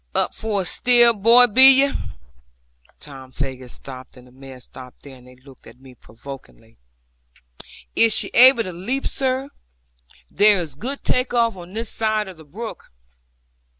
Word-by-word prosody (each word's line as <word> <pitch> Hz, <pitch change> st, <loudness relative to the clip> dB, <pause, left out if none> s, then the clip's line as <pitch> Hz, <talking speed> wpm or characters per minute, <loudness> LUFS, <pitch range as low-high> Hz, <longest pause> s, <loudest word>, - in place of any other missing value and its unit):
'Up -, -, -1 dB
for 210 Hz, -3 st, -3 dB
it -, -, -11 dB
still, 240 Hz, +4 st, +4 dB
boy, 230 Hz, +4 st, +5 dB
be 265 Hz, +4 st, +6 dB
ye?' 280 Hz, -, -2 dB, 1.1 s
Tom 135 Hz, -3 st, -14 dB
Faggus 130 Hz, -2 st, -7 dB
stopped, 130 Hz, -1 st, -13 dB
and 125 Hz, -, -17 dB
the 125 Hz, -, -21 dB
mare 135 Hz, 0 st, -14 dB
stopped 125 Hz, 0 st, -16 dB
there; 140 Hz, -2 st, -14 dB
and 125 Hz, 0 st, -20 dB
they 125 Hz, -, -18 dB
looked 130 Hz, 0 st, -20 dB
at -, -, -18 dB
me 130 Hz, -1 st, -17 dB
provokingly. 115 Hz, -1 st, -15 dB, 1.2 s
'Is 230 Hz, -1 st, +3 dB
she -, -, +2 dB
able 250 Hz, -1 st, +5 dB
to 185 Hz, -3 st, -9 dB
leap, 235 Hz, +11 st, -5 dB
sir? 265 Hz, +1 st, -4 dB, 0.8 s
There 205 Hz, -1 st, +2 dB
is 160 Hz, -5 st, -7 dB
good 255 Hz, -, -8 dB
take 250 Hz, 0 st, -2 dB
off 230 Hz, -2 st, 0 dB
on 180 Hz, 0 st, -13 dB
this 225 Hz, +1 st, -5 dB
side 215 Hz, -1 st, -2 dB
of 185 Hz, -3 st, -12 dB
the 160 Hz, -, -16 dB
brook.' 215 Hz, +10 st, -11 dB
190 Hz, 165 wpm, -19 LUFS, -, 1.2 s, be